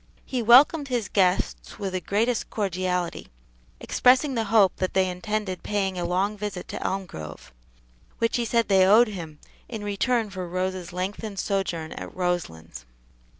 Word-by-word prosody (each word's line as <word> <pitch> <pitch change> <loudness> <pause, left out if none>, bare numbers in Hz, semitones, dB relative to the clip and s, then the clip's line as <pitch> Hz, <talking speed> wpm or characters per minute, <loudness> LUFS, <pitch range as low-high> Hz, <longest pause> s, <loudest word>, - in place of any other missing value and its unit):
He 255 -2 -2
welcomed 275 +6 +6
his 240 -6 -1
guests 185 -2 0
with 195 -3 -4
the 185 - -2
greatest 225 +6 0
cordiality, 185 -3 -2 0.5
expressing 260 +3 +3
the 225 -3 -1
hope 200 -3 +4
that 185 - -2
they 190 -1 +3
intended 190 +1 -3
paying 195 -2 -1
a 175 - -2
long 190 +4 0
visit 205 -3 -5
to - - -5
Elmgrove, 80 - -5 0.7
which 230 +1 +1
he 240 - 0
said 230 0 +1
they 190 -2 +5
owed 220 +4 +6
him 165 -7 -7 0.3
in 220 -3 -6
return 210 +2 0
for 185 -2 -5
Rose's 185 0 -3
lengthened 195 +3 -4
sojourn 180 -6 -2
at - - -8
Roselands. 80 - -3
195 Hz, 150 wpm, -25 LUFS, 180-220 Hz, 0.7 s, welcomed